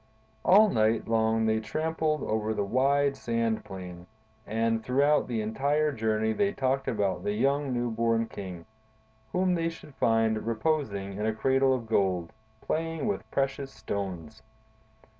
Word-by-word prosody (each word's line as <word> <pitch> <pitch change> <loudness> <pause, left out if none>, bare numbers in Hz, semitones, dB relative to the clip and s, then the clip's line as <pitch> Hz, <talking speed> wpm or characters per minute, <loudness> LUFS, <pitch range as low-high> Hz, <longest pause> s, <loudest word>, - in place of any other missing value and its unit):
"All 210 +3 +6
night 110 +1 +2
long 110 0 +2
they 110 0 +2
tramped 155 +10 -3
over 110 -9 0
the 100 - 0
wide 140 +6 +2
sand 115 -1 -1
plain, 90 -3 -9 0.4
and 115 +1 0
throughout 140 +5 +2
the 115 -3 -1
entire 145 +7 +1
journey 110 -3 0
they 200 - +1
talked 135 0 0
about 100 -4 -1
the 105 - -1
young, 140 +5 +1
new 120 -1 -1
born 115 0 +1
king, 90 -6 -8 0.7
whom 185 0 +2
they 165 -1 0
should 165 -3 -12
find 115 -2 +1
reposing 110 -6 -1
in 105 - 0
a 110 - 0
cradle 135 +2 +3
of 120 -3 -5
gold, 95 -4 0 0.3
playing 165 +3 -2
with 205 -2 -2
precious 135 0 -1
stones. 100 -1 -5
115 Hz, 145 wpm, -28 LUFS, 110-140 Hz, 0.7 s, All